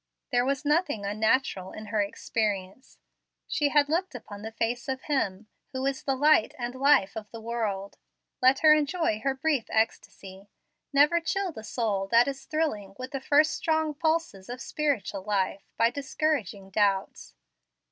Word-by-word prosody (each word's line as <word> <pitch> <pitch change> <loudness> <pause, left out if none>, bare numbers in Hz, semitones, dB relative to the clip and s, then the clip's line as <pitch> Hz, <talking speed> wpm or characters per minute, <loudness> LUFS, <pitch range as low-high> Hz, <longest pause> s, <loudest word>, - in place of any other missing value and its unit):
There 245 -1 +3
was 275 +2 -1
nothing 295 - +1
unnatural 210 -2 0
in 215 - -8
her 215 - +3
experience. 205 +1 -3 0.5
She 295 -2 +1
had 290 0 +4
looked 330 0 -1
upon 205 -4 -9
the 220 +1 -6
face 230 +2 -2
of 260 0 -3
Him 215 -9 -1 0.3
who 260 0 -2
is 275 -1 -1
the 270 - -1
light 290 -4 +4
and 240 -1 -4
life 260 -7 +3
of 215 -1 -7
the 230 - -9
world. 220 -4 -3 0.4
Let 260 +1 +4
her 310 -1 +8
enjoy 305 -6 0
the 270 -1 +1
brief 285 -5 +1
ecstasy. 200 -3 -2 0.4
Never 295 +4 +4
chill 385 +2 -1
the 220 -8 -9
soul 215 -4 -1
that 235 +4 +5
is 275 -1 -5
thrilling 215 -12 -2
with 255 0 -7
the 275 - -4
first 300 +3 +4
strong 315 -2 0
pulses 315 - -1
of 245 +1 -6
spiritual 265 -9 -2
life 195 -1 -1 0.2
by 230 +1 +3
discouraging 265 - -2
doubts. 195 - 0
245 Hz, 160 wpm, -27 LUFS, 210-290 Hz, 0.5 s, her